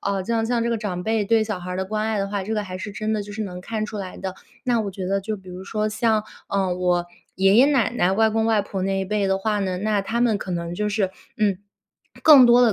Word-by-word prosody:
啊， 200 Hz, -1 st, -1 dB
就 230 Hz, +5 st, -3 dB
像 235 Hz, -1 st, +1 dB
这 235 Hz, -, 0 dB
个 230 Hz, -, 0 dB
长 185 Hz, -5 st, -3 dB
辈 220 Hz, +2 st, +1 dB
对 225 Hz, +1 st, +3 dB
小 215 Hz, -3 st, -3 dB
孩 180 Hz, -, -7 dB
儿 -, -, -3 dB
的 190 Hz, -, -1 dB
关 215 Hz, +2 st, -2 dB
爱 220 Hz, -1 st, 0 dB
的 195 Hz, 0 st, -1 dB
话， 200 Hz, -1 st, -2 dB
这 220 Hz, +3 st, -3 dB
个 210 Hz, -1 st, -1 dB
还 185 Hz, -1 st, -6 dB
是 205 Hz, -, -5 dB
真 215 Hz, +1 st, -2 dB
的 215 Hz, -1 st, -1 dB
就 205 Hz, -, -10 dB
是 215 Hz, +1 st, -3 dB
能 180 Hz, -3 st, -6 dB
看 215 Hz, +3 st, -3 dB
出 210 Hz, 0 st, -6 dB
来 185 Hz, -2 st, -6 dB
的。 190 Hz, -1 st, -5 dB, 0.3 s
那 240 Hz, -2 st, +2 dB
我 205 Hz, -2 st, -3 dB
觉 190 Hz, -1 st, -5 dB
得 195 Hz, +1 st, 0 dB
就 215 Hz, +2 st, -3 dB
比 190 Hz, -2 st, -15 dB
如 185 Hz, +1 st, -8 dB
说 215 Hz, +1 st, -1 dB
像， 215 Hz, 0 st, +1 dB, 0.2 s
嗯， 190 Hz, -2 st, 0 dB
我 180 Hz, -1 st, +1 dB, 0.3 s
爷 195 Hz, +1 st, +4 dB
爷 260 Hz, -, +7 dB
奶 270 Hz, -7 st, +2 dB
奶、 190 Hz, -6 st, +1 dB
外 220 Hz, +2 st, +3 dB
公 220 Hz, +1 st, +1 dB
外 220 Hz, -2 st, +3 dB
婆 195 Hz, -1 st, -5 dB
那 195 Hz, 0 st, 0 dB
一 -, -, -1 dB
辈 205 Hz, +1 st, 0 dB
的 190 Hz, 0 st, +2 dB
话 210 Hz, +1 st, 0 dB
呢， 190 Hz, -2 st, -1 dB
那 210 Hz, 0 st, +1 dB
他 225 Hz, +4 st, -2 dB
们 225 Hz, -4 st, +2 dB
可 190 Hz, -, -6 dB
能 170 Hz, -1 st, -3 dB
就 210 Hz, +2 st, -1 dB
是， 200 Hz, -2 st, 0 dB, 0.3 s
嗯， 205 Hz, -3 st, +1 dB, 0.6 s
更 285 Hz, -6 st, +9 dB
多 240 Hz, +1 st, +6 dB
地 235 Hz, -3 st, +5 dB
205 Hz, 305 characters per minute, -23 LUFS, 190-220 Hz, 0.6 s, 更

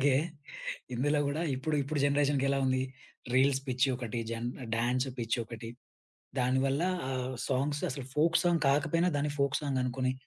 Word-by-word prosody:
అలాగే 135 Hz, -1 st, +4 dB, 0.8 s
ఇందులో 145 Hz, +4 st, +2 dB
గూడా 150 Hz, +4 st, -1 dB
ఇప్పుడు, 150 Hz, +4 st, -1 dB
ఇప్పుడు 145 Hz, +1 st, -2 dB
జనరేషన్‌కెలా 140 Hz, -1 st, +2 dB
ఉంది? 130 Hz, 0 st, +2 dB, 0.5 s
రీల్స్ 135 Hz, +1 st, +4 dB
పిచ్చి 130 Hz, +2 st, +2 dB
ఒకటి. 120 Hz, -2 st, -3 dB
జన్ 115 Hz, +1 st, -2 dB, 0.3 s
డాన్స్ 125 Hz, +3 st, +1 dB
పిచ్చి 115 Hz, +1 st, 0 dB
ఒకటి. 115 Hz, 0 st, -7 dB, 0.7 s
దానివల్ల 130 Hz, +3 st, +2 dB, 0.3 s
ఆ -, -, -1 dB, 0.4 s
సాంగ్స్ 145 Hz, +3 st, 0 dB
అసలు 130 Hz, -1 st, -5 dB
ఫోక్ 165 Hz, +2 st, +4 dB
సాంగ్ 170 Hz, -2 st, +3 dB
కాకపోయినా, 165 Hz, +5 st, +2 dB
దాన్ని 145 Hz, 0 st, 0 dB
ఫోక్ 140 Hz, 0 st, +2 dB
సాంగ్ 135 Hz, -3 st, 0 dB
అనుకుని 130 Hz, +1 st, 0 dB
135 Hz, 145 wpm, -31 LUFS, 125-145 Hz, 0.8 s, అలాగే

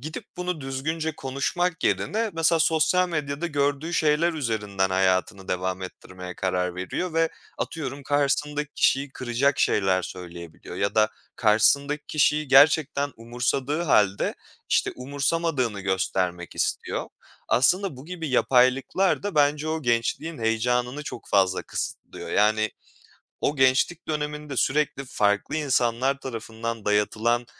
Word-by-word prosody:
gidip 155 Hz, +4 st, -6 dB
bunu 180 Hz, -3 st, -3 dB
düzgünce 155 Hz, +4 st, -3 dB
konuşmak 165 Hz, +6 st, -2 dB
yerine, 220 Hz, +1 st, 0 dB
mesela 165 Hz, 0 st, +2 dB
sosyal 160 Hz, +3 st, +3 dB
medyada 150 Hz, 0 st, -2 dB
gördüğü 145 Hz, +1 st, -1 dB
şeyler 155 Hz, +2 st, +2 dB
üzerinden 105 Hz, -9 st, -1 dB
hayatını 95 Hz, +1 st, +1 dB
devam 95 Hz, +1 st, -2 dB
ettirmeye 90 Hz, 0 st, -9 dB
karar 90 Hz, -1 st, -1 dB
veriyor 125 Hz, -, -3 dB
ve 165 Hz, 0 st, +3 dB, 0.3 s
atıyorum, 140 Hz, -3 st, -4 dB
karşısındaki 145 Hz, +1 st, 0 dB
kişiyi 135 Hz, +1 st, +2 dB
kıracak 130 Hz, +3 st, 0 dB
şeyler 95 Hz, -2 st, +2 dB
söyleyebiliyor 85 Hz, -2 st, -9 dB
ya 100 Hz, +1 st, -1 dB
da 110 Hz, 0 st, +4 dB, 0.3 s
karşısındaki 140 Hz, +7 st, +3 dB
kişiyi 150 Hz, -1 st, +2 dB
gerçekten 145 Hz, 0 st, +4 dB
umursadığı 125 Hz, +6 st, -1 dB
hâlde, 105 Hz, -, +2 dB, 0.3 s
işte, -, -, +1 dB
umursamadığını 140 Hz, -3 st, -1 dB
göstermek 95 Hz, -2 st, -1 dB
istiyor. -, -, -2 dB, 0.4 s
Aslında 180 Hz, +4 st, +2 dB
bu 130 Hz, -, -11 dB
gibi 165 Hz, -1 st, -5 dB
yapaylıklar 130 Hz, +9 st, +3 dB
da 205 Hz, -3 st, -3 dB
bence 150 Hz, +1 st, +2 dB
o 160 Hz, -1 st, -2 dB
gençliğin 120 Hz, +7 st, -1 dB
heyecanını 125 Hz, +4 st, 0 dB
çok 130 Hz, -4 st, -8 dB
fazla 95 Hz, -2 st, +2 dB
kısıtlıyor. -, -, -6 dB
Yani, 110 Hz, +1 st, +2 dB, 0.7 s
o 145 Hz, -, +1 dB
gençlik 130 Hz, +5 st, +2 dB
döneminde, 150 Hz, -2 st, -3 dB
sürekli 140 Hz, -1 st, +1 dB
farklı 105 Hz, +1 st, 0 dB
insanlar 130 Hz, -2 st, +1 dB
tarafından 115 Hz, -2 st, -5 dB
dayatılan 110 Hz, +3 st, +1 dB
135 Hz, 120 wpm, -25 LUFS, 110-150 Hz, 0.7 s, da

